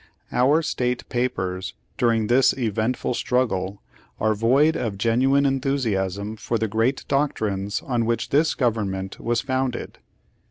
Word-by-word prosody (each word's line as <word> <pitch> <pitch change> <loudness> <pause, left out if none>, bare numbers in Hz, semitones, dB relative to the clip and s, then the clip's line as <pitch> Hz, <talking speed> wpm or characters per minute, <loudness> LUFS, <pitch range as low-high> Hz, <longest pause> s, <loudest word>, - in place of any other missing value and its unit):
Our 145 +6 +3
state 125 -4 -2
papers 95 -7 -2 0.2
during 115 -4 +2
this 125 +4 +4
eventful 115 +1 -1
struggle 100 -7 -1 0.4
are 110 0 +2
void 130 +9 +3
of 105 -4 -2
genuine 130 +6 +3
enthusiasm 110 -7 -1
for 115 - -2
the 110 0 -1
great 115 +6 0
doctrines 105 -8 -1
on 120 -3 -1
which 115 0 -1
this 150 +3 +2
government 100 -6 -1
was 120 0 0
founded." 130 -1 -3
120 Hz, 125 wpm, -23 LUFS, 105-130 Hz, 0.4 s, this